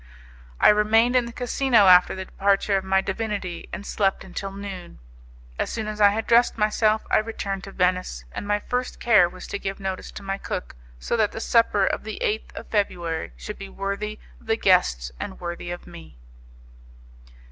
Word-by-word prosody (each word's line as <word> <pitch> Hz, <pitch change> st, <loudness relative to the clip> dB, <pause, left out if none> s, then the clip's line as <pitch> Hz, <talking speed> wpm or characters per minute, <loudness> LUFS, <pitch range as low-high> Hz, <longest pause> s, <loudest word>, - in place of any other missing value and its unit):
I -, -, +7 dB
remained 225 Hz, +4 st, +4 dB
in 250 Hz, -1 st, +4 dB
the 235 Hz, -, -7 dB
casino 245 Hz, -2 st, +2 dB
after 180 Hz, 0 st, +6 dB
the 190 Hz, 0 st, -5 dB
departure 200 Hz, +1 st, +1 dB
of 190 Hz, -, 0 dB
my 190 Hz, 0 st, +2 dB
divinity, 200 Hz, -3 st, -4 dB
and 200 Hz, -, -6 dB
slept 195 Hz, -2 st, 0 dB
until 195 Hz, +1 st, -6 dB
noon. 195 Hz, -3 st, -8 dB, 0.6 s
As -, -, 0 dB
soon 220 Hz, -2 st, -3 dB
as 215 Hz, 0 st, -4 dB
I 205 Hz, -, +8 dB
had 220 Hz, +2 st, -2 dB
dressed 235 Hz, 0 st, +4 dB
myself, 215 Hz, 0 st, +2 dB
I -, -, +5 dB
returned 200 Hz, -3 st, -4 dB
to 195 Hz, -, -9 dB
Venice, 180 Hz, -, -1 dB
and 205 Hz, -, -6 dB
my 205 Hz, 0 st, +2 dB
first 250 Hz, +3 st, -3 dB
care 210 Hz, -7 st, +5 dB
was 185 Hz, +1 st, -10 dB
to 200 Hz, -, -5 dB
give 195 Hz, 0 st, -4 dB
notice 190 Hz, -1 st, -4 dB
to -, -, -9 dB
my 195 Hz, 0 st, -3 dB
cook, 60 Hz, -, -5 dB, 0.2 s
so -, -, -1 dB
that 215 Hz, -2 st, +1 dB
the -, -, -5 dB
supper 225 Hz, -4 st, +3 dB
of -, -, -1 dB
the 220 Hz, 0 st, -6 dB
8th 215 Hz, +1 st, -1 dB
of -, -, -8 dB
February 175 Hz, -6 st, -1 dB
should 210 Hz, -, -8 dB
be 195 Hz, 0 st, -7 dB
worthy 200 Hz, +2 st, -4 dB, 0.2 s
of -, -, -21 dB
the 225 Hz, 0 st, +2 dB
guests 65 Hz, -, +2 dB
and -, -, -6 dB
worthy 175 Hz, 0 st, -5 dB
of 175 Hz, 0 st, -6 dB
me. 170 Hz, -, -13 dB
200 Hz, 190 wpm, -24 LUFS, 185-215 Hz, 0.6 s, I